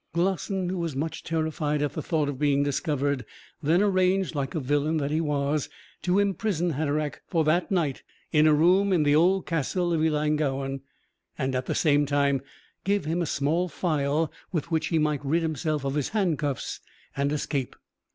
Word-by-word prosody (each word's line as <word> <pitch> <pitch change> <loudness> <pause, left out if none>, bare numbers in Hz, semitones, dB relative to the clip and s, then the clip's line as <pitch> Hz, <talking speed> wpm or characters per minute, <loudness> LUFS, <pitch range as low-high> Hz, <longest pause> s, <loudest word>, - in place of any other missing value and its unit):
Glossin, 190 +1 0
who 185 0 -2
was 165 -5 -2
much 160 +3 -3
terrified 155 -2 -1
at 145 - -1
the - - -3
thought 155 -4 0
of 140 -2 -4
being 140 -1 +3
discovered, 145 -2 -1 0.4
then 165 +6 +3
arranged, 185 -2 +2
like 140 -1 -3
a - - +1
villain 145 +3 +1
that 145 -1 -1
he 155 +2 +1
was, 145 -1 0 0.3
to 180 +1 +1
imprison 195 -3 +1
Hatteraick 150 0 -2
for 165 -4 +1
that 165 +4 +2
night 165 -8 0 0.3
in 155 0 +5
a 155 - +6
room 185 +6 +4
in 175 -5 +3
the 145 0 +3
old 180 +4 +3
castle 170 +2 0
of 160 - +1
Ellangowan, 150 -3 0 0.6
and 130 -2 -1
at 125 0 -2
the - - -1
same 145 -2 +3
time 140 -1 +2 0.4
give 200 -3 0
him 165 +3 0
a 170 - -1
small 155 +5 0
file 155 -2 0 0.2
with 170 0 -3
which 160 0 +1
he 165 - +1
might 150 -2 0
rid 160 +4 +1
himself 155 -2 -1
of 135 - -1
his 145 -2 -1
handcuffs 165 - -1 0.4
and 140 +1 0
escape. 145 -3 -2
155 Hz, 180 wpm, -26 LUFS, 145-170 Hz, 0.6 s, a